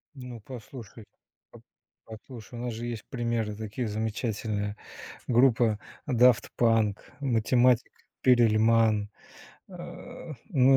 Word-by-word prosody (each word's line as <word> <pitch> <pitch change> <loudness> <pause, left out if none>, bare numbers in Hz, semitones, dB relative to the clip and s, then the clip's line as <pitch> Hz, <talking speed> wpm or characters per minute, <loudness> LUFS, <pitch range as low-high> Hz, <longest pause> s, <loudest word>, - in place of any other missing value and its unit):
Ну, 125 -3 -8
послушай, 115 -2 -10 0.5
по - - -15 0.4
послушай, 115 +1 -10
у 120 - -5
нас 120 -2 -3
же 115 +2 -6
есть 115 -3 -5
примеры 115 -4 -1
такие 110 +2 -4
замечательные. 105 -1 -2 0.5
Группа 120 -3 +4 0.3
Daft 125 -2 +5
Punk, 115 -3 +3 0.2
математик 125 -1 +3 0.3
Перельман, 115 -3 +4 0.6
а, 155 - -9 0.2
ну 135 -5 +5
115 Hz, 100 wpm, -28 LUFS, 110-125 Hz, 0.6 s, Daft